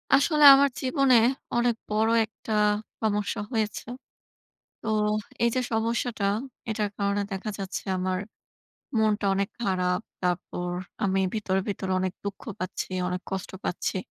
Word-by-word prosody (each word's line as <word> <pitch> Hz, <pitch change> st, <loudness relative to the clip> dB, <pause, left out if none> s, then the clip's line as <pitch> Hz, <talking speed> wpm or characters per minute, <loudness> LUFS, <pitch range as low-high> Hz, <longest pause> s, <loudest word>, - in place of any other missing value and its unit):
আসলে 300 Hz, +1 st, +3 dB
আমার 280 Hz, +1 st, +4 dB
জীবনে 265 Hz, -1 st, +3 dB, 0.4 s
অনেক 240 Hz, -1 st, +2 dB
বড় 215 Hz, +1 st, +2 dB, 0.2 s
একটা 220 Hz, +1 st, -10 dB, 0.5 s
সমস্যা 210 Hz, 0 st, 0 dB
হয়েছে। 220 Hz, -3 st, -1 dB, 1.0 s
তো 220 Hz, -, -4 dB, 0.5 s
এই 235 Hz, -, +5 dB
যে 255 Hz, -, +2 dB
সমস্যাটা 225 Hz, -1 st, 0 dB, 0.5 s
এটার 210 Hz, -1 st, -1 dB
কারণে 200 Hz, 0 st, +1 dB
দেখা 195 Hz, +3 st, -3 dB
যাচ্ছে 195 Hz, 0 st, -4 dB, 0.2 s
আমার 185 Hz, 0 st, 0 dB, 0.8 s
মনটা 215 Hz, -1 st, +2 dB
অনেক 195 Hz, +1 st, 0 dB
খারাপ। 185 Hz, -3 st, +1 dB, 0.2 s
তারপর, 180 Hz, 0 st, -2 dB, 0.3 s
আমি 195 Hz, -1 st, +2 dB
ভিতরে, 195 Hz, -3 st, 0 dB
ভিতরে 190 Hz, -1 st, -3 dB
অনেক 185 Hz, -1 st, -1 dB
দুঃখ 200 Hz, -1 st, -4 dB, 0.2 s
পাচ্ছি, 185 Hz, 0 st, -4 dB, 0.2 s
অনেক 180 Hz, 0 st, -2 dB
কষ্ট 190 Hz, -1 st, -3 dB
পাচ্ছি 185 Hz, -, -1 dB
205 Hz, 130 wpm, -27 LUFS, 190-225 Hz, 1.0 s, এই